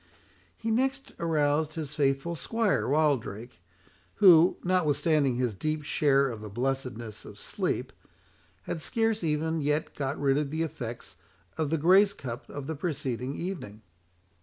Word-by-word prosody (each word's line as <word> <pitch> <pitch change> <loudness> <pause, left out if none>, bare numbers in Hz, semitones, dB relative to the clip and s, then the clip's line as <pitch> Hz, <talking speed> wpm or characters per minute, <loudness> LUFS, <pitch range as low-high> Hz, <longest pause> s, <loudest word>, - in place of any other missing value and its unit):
He 225 - -2
next 265 +4 0
aroused 155 -1 +1
his 155 -3 -4
faithful 140 +2 0
squire, 225 +5 0
Wildrake, 130 - 0 0.5
who, 180 -4 +7
notwithstanding 155 -6 +2
his 125 -2 0
deep 155 +8 -2
share 140 -2 +3
of 115 -4 -6
the 105 - -7
"blessedness 120 -1 -3
of - - -11
sleep," - - -2 0.7
had 160 - -4
scarce 225 +2 0
even 160 +1 0
yet 150 +2 0
got 140 0 -3
rid 140 0 +2
of 150 -2 -2
the 160 +3 -1
effects 120 -7 -6 0.4
of 155 -3 -1
the 160 - +1
grace 190 +6 +5
cup 125 -4 -7
of 145 -1 -6
the 160 - -4
preceding 135 -4 -3
evening. 155 - -6
150 Hz, 140 wpm, -28 LUFS, 135-165 Hz, 0.7 s, who